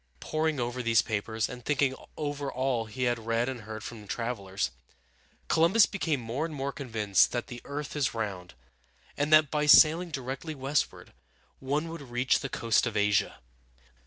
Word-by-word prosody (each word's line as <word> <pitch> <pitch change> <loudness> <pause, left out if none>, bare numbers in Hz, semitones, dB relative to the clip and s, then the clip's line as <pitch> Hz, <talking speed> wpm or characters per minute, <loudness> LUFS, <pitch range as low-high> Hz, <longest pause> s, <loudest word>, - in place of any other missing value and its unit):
Poring 155 -2 -1
over 120 +1 -2
these 115 -1 +3
papers, 110 +1 -2
and 125 -1 -9
thinking 140 -1 +1 0.2
over 145 -2 -3
all 130 -3 -1
he 110 +4 -5
had 120 -1 +1
read 115 +1 0
and 130 -3 -4
heard 110 0 -8
from 110 -4 -9
travelers, 100 - -3 0.8
Columbus 170 +7 +5
became 165 -8 -1
more 120 +5 -3
and 160 -2 -4
more 140 0 -2
convinced 110 -8 +1
that 120 - -2
the 120 -1 -9
earth 145 +1 -5
is 135 -6 0
round, 95 - -4 0.6
and 145 +1 -1
that 155 -2 +6
by 150 -1 0
sailing 165 +4 +7
directly 135 +2 -5
westward 135 +2 -2 0.5
one 145 +4 -1
would 165 -1 -7
reach 125 -1 +1
the 135 - -5
coast 115 +1 +1
of 110 -2 -3
Asia. 105 0 +1
130 Hz, 165 wpm, -29 LUFS, 115-145 Hz, 0.8 s, sailing